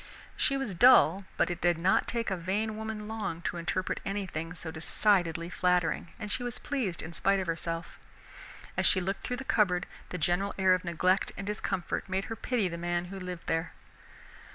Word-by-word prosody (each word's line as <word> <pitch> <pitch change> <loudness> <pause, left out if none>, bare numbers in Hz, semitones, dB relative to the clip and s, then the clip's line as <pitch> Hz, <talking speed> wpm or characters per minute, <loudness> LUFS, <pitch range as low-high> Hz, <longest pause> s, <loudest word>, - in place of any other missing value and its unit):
She 275 - +2
was 270 -7 -2
dull, 195 -3 +6
but - - +2
it 175 - -5
did 175 -2 +3
not 180 +3 +3
take 230 -3 -1
a - - +1
vain 200 +5 -1
woman 220 -1 -5
long 215 -7 -4
to - - -2
interpret 175 +2 -1
anything 180 -5 -3
so 165 -2 -6
decidedly 170 0 +1
flattering, 180 -1 +1
and 210 -2 -5
she 250 - -1
was 245 0 -3
pleased 240 - -2
in 160 +1 -7
spite 195 +3 +2
of 190 - -2
herself. 165 0 -3 0.8
As - - +3
she 185 - +5
looked 195 +2 -2
through 250 - -3
the 270 - -5
cupboard, 190 -8 +2 0.2
the 180 - -4
general 180 +5 0
air 190 -1 +5
of 185 - 0
neglect 180 +2 +1
and 195 - -5
discomfort 195 -2 -2
made 190 +1 -1
her - - -5
pity 230 -4 0
the 170 -1 -5
man 175 0 -1
who 195 - -5
lived 180 -2 -6
there. 165 0 -1
185 Hz, 195 wpm, -30 LUFS, 170-210 Hz, 0.8 s, dull